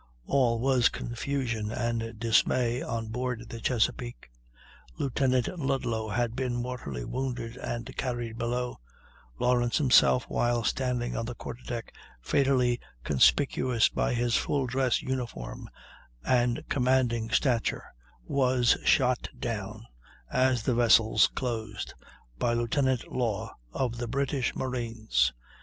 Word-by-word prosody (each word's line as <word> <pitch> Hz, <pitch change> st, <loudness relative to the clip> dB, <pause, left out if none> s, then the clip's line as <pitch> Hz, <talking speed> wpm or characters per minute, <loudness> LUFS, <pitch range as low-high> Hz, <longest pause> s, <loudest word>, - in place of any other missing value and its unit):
All 125 Hz, -4 st, +2 dB
was 130 Hz, -1 st, +4 dB
confusion 120 Hz, -3 st, -3 dB
and 115 Hz, -1 st, -2 dB
dismay 120 Hz, +2 st, +2 dB
on 115 Hz, -1 st, -3 dB
board 125 Hz, -1 st, -3 dB
the 115 Hz, -, -7 dB
Chesapeake. 120 Hz, -, -1 dB, 0.7 s
Lieutenant 130 Hz, -2 st, +1 dB
Ludlow 125 Hz, -6 st, -1 dB
had 115 Hz, +2 st, -1 dB
been 130 Hz, -2 st, -1 dB
mortally 120 Hz, -, -4 dB
wounded 125 Hz, -3 st, -3 dB
and 120 Hz, +2 st, -5 dB
carried 120 Hz, -3 st, -3 dB
below; 125 Hz, +1 st, -2 dB, 0.6 s
Lawrence 120 Hz, -, +2 dB
himself, 95 Hz, -, +5 dB
while 120 Hz, -1 st, +1 dB
standing 125 Hz, 0 st, -1 dB
on 115 Hz, 0 st, -2 dB
the 125 Hz, -, -5 dB
quarterdeck, 120 Hz, -1 st, -6 dB, 0.3 s
fatally 125 Hz, -, +2 dB, 0.2 s
conspicuous 75 Hz, -, +3 dB
by -, -, 0 dB
his 120 Hz, 0 st, +1 dB
full 140 Hz, -2 st, +1 dB
dress 130 Hz, 0 st, +1 dB
uniform 120 Hz, -, -5 dB, 0.6 s
and 120 Hz, -1 st, +2 dB
commanding 125 Hz, -3 st, +1 dB
stature, 120 Hz, -2 st, +1 dB, 0.4 s
was 125 Hz, -, +3 dB
shot 130 Hz, -2 st, +3 dB
down, 110 Hz, -1 st, -4 dB, 0.5 s
as 130 Hz, -3 st, +2 dB
the 125 Hz, -, +1 dB
vessels 115 Hz, -3 st, +5 dB
closed, 110 Hz, -5 st, -4 dB, 0.5 s
by 120 Hz, -, +1 dB
Lieutenant 125 Hz, +2 st, 0 dB
Law 115 Hz, -6 st, -2 dB, 0.2 s
of 120 Hz, -, -2 dB
the 120 Hz, -, -3 dB
British 135 Hz, 0 st, -1 dB
marines. 115 Hz, -, 0 dB
120 Hz, 115 wpm, -28 LUFS, 115-130 Hz, 0.7 s, himself